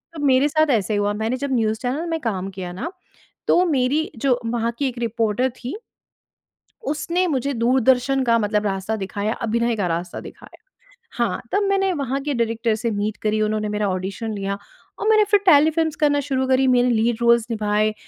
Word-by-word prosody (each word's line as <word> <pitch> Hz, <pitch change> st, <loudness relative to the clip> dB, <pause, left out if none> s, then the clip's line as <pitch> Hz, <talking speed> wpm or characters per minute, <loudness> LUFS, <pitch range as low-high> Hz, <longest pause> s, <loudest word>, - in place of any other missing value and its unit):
तब 310 Hz, -, -6 dB
मेरे 265 Hz, +1 st, +4 dB
साथ 310 Hz, 0 st, +2 dB
ऐसा 215 Hz, -3 st, +1 dB
ही -, -, +1 dB
हुआ, 205 Hz, 0 st, 0 dB
मैंने 220 Hz, +4 st, -2 dB
जब 280 Hz, +1 st, -3 dB
न्यूज़ 220 Hz, -3 st, +1 dB
चैनल 265 Hz, +6 st, -2 dB
में 325 Hz, -1 st, -1 dB
काम 195 Hz, -5 st, -2 dB
किया 185 Hz, -2 st, -6 dB
ना 255 Hz, -, -5 dB, 0.6 s
तो 355 Hz, -, +4 dB
मेरी 290 Hz, 0 st, +1 dB
जो 250 Hz, +1 st, +1 dB
वहाँ 230 Hz, 0 st, -1 dB
की 280 Hz, -, +1 dB
एक 250 Hz, -, -5 dB
रिपोर्टर 230 Hz, +1 st, 0 dB
थी। 250 Hz, +6 st, -6 dB, 1.1 s
उसने 335 Hz, +5 st, 0 dB
मुझे 280 Hz, -4 st, -1 dB
दूरदर्शन 255 Hz, +2 st, +2 dB
का 230 Hz, -1 st, +3 dB
मतलब 210 Hz, -1 st, 0 dB
रास्ता 195 Hz, +2 st, -2 dB
दिखाया, 200 Hz, +1 st, -3 dB
अभिनय 235 Hz, 0 st, 0 dB
का 200 Hz, -4 st, -1 dB
रास्ता 170 Hz, +1 st, -3 dB
दिखाया। -, -, -13 dB, 0.6 s
हाँ, 235 Hz, -1 st, 0 dB
तब 410 Hz, -, +2 dB
मैंने 390 Hz, -1 st, +2 dB
वहाँ 275 Hz, -4 st, -2 dB
के 290 Hz, 0 st, -1 dB
डायरेक्टर 230 Hz, -2 st, 0 dB
से 230 Hz, +2 st, -2 dB
मीट 210 Hz, +1 st, -2 dB
करी, 215 Hz, 0 st, 0 dB
उन्होंने 215 Hz, 0 st, 0 dB
मेरा 210 Hz, 0 st, -1 dB
ऑडिशन 195 Hz, +4 st, -3 dB
लिया 200 Hz, -1 st, -3 dB, 0.4 s
और 425 Hz, -, -2 dB
मैंने 430 Hz, -1 st, +6 dB
फिर 410 Hz, -, +6 dB
टेलीफ़िल्म्स 315 Hz, -1 st, +4 dB
करना 290 Hz, -1 st, +2 dB
शुरू 265 Hz, -2 st, -1 dB
करी। 260 Hz, 0 st, +3 dB
मेरे 250 Hz, -1 st, +4 dB
लीड 230 Hz, 0 st, +1 dB
रोल्स 235 Hz, -1 st, +4 dB
निभाए, 215 Hz, -1 st, +1 dB
235 Hz, 190 wpm, -22 LUFS, 215-280 Hz, 1.1 s, मैंने